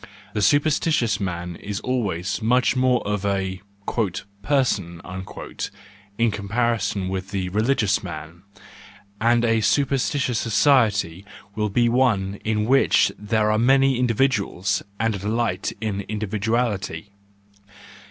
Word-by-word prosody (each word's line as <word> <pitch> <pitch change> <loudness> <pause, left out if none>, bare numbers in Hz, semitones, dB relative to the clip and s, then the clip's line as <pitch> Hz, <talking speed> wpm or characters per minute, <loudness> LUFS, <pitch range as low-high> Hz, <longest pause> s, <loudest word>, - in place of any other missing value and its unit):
The 105 - -1
superstitious 145 - +2
man 90 -2 -4
is 100 -1 -5
always 100 -7 -2
much 125 +4 +2
more 125 -3 +2
of 105 -1 -1
a 95 -2 -1 0.4
" 100 0 -5
person," 105 - 0 1.2
in 115 -1 +2
comparison 105 -1 -1
with 95 0 -4
the 95 -2 -2
religious 105 0 +1
man, 85 -3 -8 0.8
and 120 +1 +3
a 115 -1 +2
superstitious 135 0 +1
society 105 - +2 0.3
will 105 0 -1
be 120 +4 +2
one 110 -6 +1
in 105 -1 0
which 135 +4 +4
there 105 0 +1
are 110 - +2
many 135 +1 +4
individuals, 105 -5 +1 0.2
and 115 +1 +1
a 100 - -4
delight 105 -1 -1
in 105 -3 -2
individuality. 105 -3 -2
105 Hz, 115 wpm, -23 LUFS, 100-120 Hz, 1.2 s, which